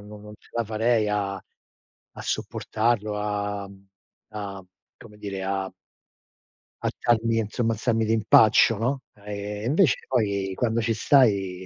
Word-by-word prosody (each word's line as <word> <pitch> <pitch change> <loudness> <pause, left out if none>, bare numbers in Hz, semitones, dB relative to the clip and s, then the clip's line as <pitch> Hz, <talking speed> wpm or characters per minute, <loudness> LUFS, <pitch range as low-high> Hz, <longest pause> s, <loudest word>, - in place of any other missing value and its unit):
no 105 +1 -11
non 105 0 -12
ce - - -24
la 115 -1 -1
farei 110 0 +1
a 100 -2 -1
a 95 - -17
sopportarlo, 110 -2 -1
a 105 -1 -3 0.6
a 100 -3 -7 0.3
come 105 - -14
dire 100 -2 -5
a 95 0 -2 1.1
alzarmi, 115 -1 +1
insomma, 115 +2 -1
alzarmi 115 0 0
d'impaccio, 110 0 +5
no? 125 +5 -1 0.2
Ehm, 105 +1 -5
invece 155 +4 +2
poi, 100 -6 0
quando 115 0 0
ci 115 0 0
stai, 100 -8 +3
105 Hz, 125 wpm, -25 LUFS, 100-115 Hz, 1.1 s, d'impaccio